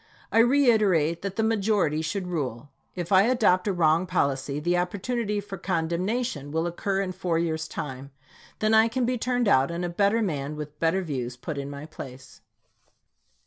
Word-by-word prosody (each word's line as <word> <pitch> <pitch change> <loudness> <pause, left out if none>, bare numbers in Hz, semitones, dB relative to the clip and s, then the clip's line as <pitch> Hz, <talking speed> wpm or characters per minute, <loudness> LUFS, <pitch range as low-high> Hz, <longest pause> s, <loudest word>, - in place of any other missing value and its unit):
I 225 - +4
reiterate, 215 - +3
that 195 0 -4
the 220 - 0
majority 205 -8 +1
should 180 +4 -3
rule. 145 -7 -4 0.3
If 175 -1 -5
I 190 -1 +7
adopt 210 -7 +3
a - - +2
wrong 170 0 +2
policy, 140 -5 0
the 175 +4 +1
opportunity 205 +4 -1
for 195 -2 -7
condemnation 175 - -1
will 160 +2 0
occur 195 +3 -1
in 190 -2 -2
four 180 -2 -1
years' 160 -1 -1
time. 135 -2 -6 0.5
Then 215 0 +1
I 220 +1 +6
can 250 +2 -1
be 250 0 -1
turned 245 -1 0
out, 135 -7 +4
and 170 +1 -3
a - - -2
better 200 +6 +2
man 150 -6 -3
with 150 0 -8
better 165 +4 +1
views 125 -6 -4
put 145 +3 -5
in 140 0 -5
my 140 +1 -7
place. 130 -4 -11
175 Hz, 180 wpm, -26 LUFS, 150-205 Hz, 0.5 s, I